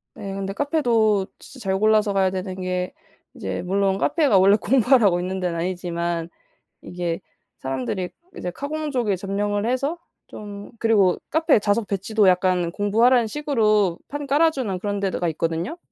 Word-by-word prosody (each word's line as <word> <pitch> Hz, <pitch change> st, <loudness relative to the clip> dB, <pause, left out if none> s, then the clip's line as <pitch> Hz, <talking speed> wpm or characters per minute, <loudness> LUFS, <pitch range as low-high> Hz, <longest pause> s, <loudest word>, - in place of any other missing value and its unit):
네. 195 Hz, -, -6 dB
그런데 195 Hz, 0 st, -4 dB
카페도 230 Hz, -8 st, +1 dB
진짜 260 Hz, 0 st, -13 dB
잘 190 Hz, 0 st, +1 dB
골라서 215 Hz, -1 st, +3 dB
가야 190 Hz, -1 st, +3 dB
되는 185 Hz, 0 st, -4 dB
게 180 Hz, 0 st, -2 dB, 0.4 s
이제 95 Hz, -, -4 dB
물론 195 Hz, +1 st, +1 dB
카페가 290 Hz, -, +2 dB
원래 195 Hz, +2 st, +6 dB
공부하라고 235 Hz, -5 st, +3 dB
있는 185 Hz, +1 st, -3 dB
데는 180 Hz, -2 st, -2 dB
아니지만 170 Hz, -1 st, -2 dB, 0.5 s
이게 175 Hz, -2 st, -4 dB, 0.4 s
사람들이 135 Hz, +7 st, -3 dB, 0.3 s
이제 180 Hz, -, -4 dB
카공족에 280 Hz, -, -2 dB
점령을 205 Hz, +2 st, -2 dB
해서 275 Hz, +6 st, -1 dB, 0.3 s
좀 205 Hz, -1 st, -9 dB
그리고 205 Hz, -5 st, +3 dB
카페 320 Hz, -6 st, +3 dB
좌석 205 Hz, +1 st, 0 dB
배치도 205 Hz, +1 st, +1 dB
약간 180 Hz, -1 st, +2 dB
공부하라는 225 Hz, +5 st, +3 dB
식으로 215 Hz, -, +1 dB
판 290 Hz, 0 st, -5 dB
깔아 295 Hz, +4 st, +4 dB
주는 230 Hz, -11 st, -3 dB
그런 205 Hz, +1 st, -2 dB
데 195 Hz, -1 st, -1 dB
드 -, -, -3 dB
가 175 Hz, -, 0 dB
있거든요. 165 Hz, -, -2 dB
200 Hz, 345 characters per minute, -23 LUFS, 180-235 Hz, 0.5 s, 원래